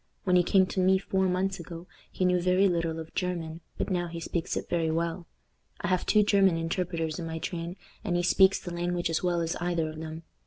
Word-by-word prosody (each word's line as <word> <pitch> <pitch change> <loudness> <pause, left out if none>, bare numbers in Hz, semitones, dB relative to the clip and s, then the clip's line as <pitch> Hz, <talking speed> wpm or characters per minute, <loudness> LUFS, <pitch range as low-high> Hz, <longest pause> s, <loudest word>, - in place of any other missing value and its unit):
When 180 -1 +2
he 180 - +7
came 190 +2 +4
to 185 - -3
me 190 +1 +5
four 190 0 0
months 190 +1 0
ago 170 0 -8 0.3
he 185 - -1
knew 180 -1 +3
very 185 +2 +4
little 170 -3 0
of 160 0 -8
German, 170 -3 -3 0.2
but - - -2
now 175 -1 0
he 170 0 -6
speaks 165 +1 -2
it - - -4
very 165 -2 0
well. 170 +1 -2 0.5
I 175 - -1
have 185 -1 0
two 210 -1 +5
German 195 -4 +4
interpreters 165 -1 -2
in 165 - -4
my 160 0 -4
train, 170 +1 -4 0.3
and 185 -5 -1
he 175 - +1
speaks 190 +2 +5
the 175 - -7
language 175 0 -1
as 165 - 0
well 175 -1 +1
as 165 0 -1
either 175 -2 0
of 155 0 -8
them. 160 +1 -7
175 Hz, 230 wpm, -28 LUFS, 165-185 Hz, 0.5 s, he